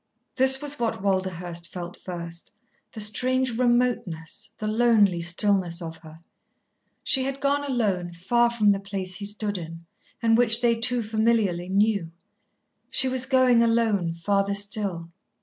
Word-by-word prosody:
This 265 +1 +3
was 290 0 -3
what 225 -5 -2
Walderhurst 180 -3 -2
felt 175 -1 -7
first, 170 -2 -8 0.4
the - - -9
strange 250 +3 0
remoteness, 240 -10 -1
the 215 - -5
lonely 215 -5 +3
stillness 175 0 +2
of 165 -2 -6
her. 160 0 -15 0.8
She 265 - +2
had 275 0 -4
gone 285 +1 0
alone 205 -10 -1
far 235 +8 +1
from 215 -3 +3
the 195 - 0
place 195 -2 -4
he 205 - -6
stood 205 -1 -1
in, 165 0 -9 0.3
and 225 -1 +3
which 230 -1 +3
they 240 -1 +3
two 240 +1 +1
familiarly 215 -5 0
knew. 200 -3 +1 0.8
She 265 - +2
was 260 0 0
going, 255 -3 +4
alone, 225 -7 +1
farther 200 +3 0
still. 200 -4 -2
205 Hz, 145 wpm, -25 LUFS, 180-240 Hz, 0.8 s, going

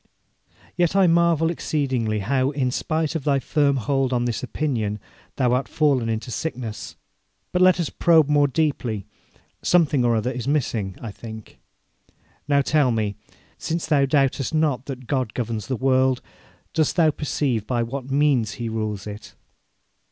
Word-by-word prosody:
Yet 175 0 +1
I 195 -1 +5
marvel 170 -1 +3
exceedingly 130 -10 -1
how, 130 +5 +1
in 135 -3 -1
spite 160 +4 -1
of 160 -4 -3
thy 140 -1 +2
firm 140 +1 +1
hold 135 +2 0
on 120 -1 +1
this 120 -3 -2
opinion, 120 -7 -2 0.4
thou 125 -2 +2
art 130 +2 0
fallen 140 -7 +1
into 115 +2 -3
sickness. 120 -7 -5 0.6
But 180 - +1
let 185 -1 +5
us 170 - -1
probe 165 -4 +4
more 145 -1 +4
deeply: 130 - -1 0.6
something 155 -7 +3
or 120 -1 +3
other 110 +3 0
is 125 -1 -5
missing, 115 -10 -1
I 115 - -6
think. 110 0 -10 0.9
Now, 140 -1 +3
tell 150 -2 +3
me, 110 -3 -1 0.4
since 165 +1 -2
thou 145 -3 +3
doubtest 135 +1 +1
not 145 -5 +1
that 130 -2 -6
God 130 -3 -2
governs 115 -3 -3
the 130 - -1
world, 130 0 +2 0.5
dost 155 -2 +1
thou 160 -3 +4
perceive 135 -7 -2
by 120 -2 0
what 130 +3 -5
means 135 -6 +2
He 115 -1 -4
rules 110 -3 -3
it?' 105 0 -9
135 Hz, 160 wpm, -23 LUFS, 115-150 Hz, 0.9 s, I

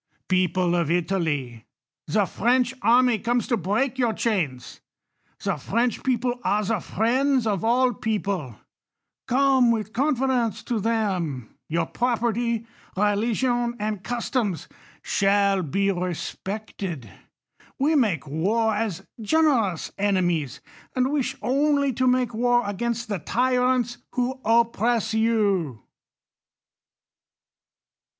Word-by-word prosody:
People 185 -1 +2
of 170 -4 0
Italy, 160 - -1 0.4
the 200 +6 +2
French 245 +5 +1
army 240 +1 +4
comes 240 +3 0
to 245 - +1
break 230 +6 -1
your 240 -3 +2
chains; 155 - -2 0.6
the - - 0
French 235 +3 -1
peo})le 250 -1 0
are 210 0 +1
the 215 +1 0
friends 250 +7 +1
of 200 -5 -1
all 245 +3 +3
V - - -12
people; 195 - -2 0.7
come 265 -1 +4
with 220 -2 -1
confidence 255 -5 0
to 235 -3 -2
them; 190 - -1 0.2
your 165 +2 0
prop 240 -2 -1
erty, 235 -1 0 0.3
religion, 235 +4 +1
and 210 -3 -3
customs 235 - -2 0.4
shall 200 -1 +2
be 195 +5 0
respected. 180 - -5 0.7
We 290 +4 +2
make 205 - +1
war 205 +10 0
as 210 -4 -3 0.2
generous 230 - +1
enemies; 175 -8 0 0.3
and 255 +1 +1
wish 290 -4 -1
only 280 +1 +2
to 255 +2 +1
make 250 -1 +2
war 240 +2 +2
against 235 +4 -2
the 200 -4 -2
tyrants 250 +3 +1
who 255 +1 -1
oppress 230 0 +2
you. 200 - +1
225 Hz, 115 wpm, -24 LUFS, 190-245 Hz, 0.7 s, army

